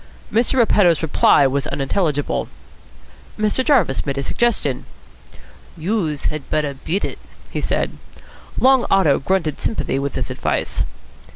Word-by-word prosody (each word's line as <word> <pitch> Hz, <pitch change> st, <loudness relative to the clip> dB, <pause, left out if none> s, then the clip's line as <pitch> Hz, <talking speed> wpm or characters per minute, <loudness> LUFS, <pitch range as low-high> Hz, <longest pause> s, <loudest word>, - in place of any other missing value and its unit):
Mr. 230 Hz, +4 st, +2 dB
Repetto's 200 Hz, -, +4 dB
reply 145 Hz, -2 st, +4 dB
was 135 Hz, +1 st, 0 dB
unintelligible. 145 Hz, 0 st, -1 dB, 0.9 s
Mr. 215 Hz, +4 st, +1 dB
Jarvis 235 Hz, -, +2 dB
made 140 Hz, -1 st, -3 dB
a 140 Hz, -, -1 dB
suggestion. 200 Hz, -, 0 dB, 0.9 s
"Youse 165 Hz, -4 st, -1 dB
had 155 Hz, -2 st, -7 dB
better 150 Hz, -2 st, 0 dB
beat 165 Hz, +8 st, -2 dB
it," -, -, -6 dB, 0.3 s
he -, -, -3 dB
said. -, -, -1 dB, 0.7 s
Long 260 Hz, -1 st, +4 dB
Otto 185 Hz, -8 st, +4 dB
grunted 165 Hz, 0 st, -1 dB
sympathy 215 Hz, -10 st, -1 dB
with 140 Hz, -1 st, -3 dB
this -, -, -3 dB
advice. -, -, -1 dB
160 Hz, 125 wpm, -20 LUFS, 140-215 Hz, 0.9 s, Repetto's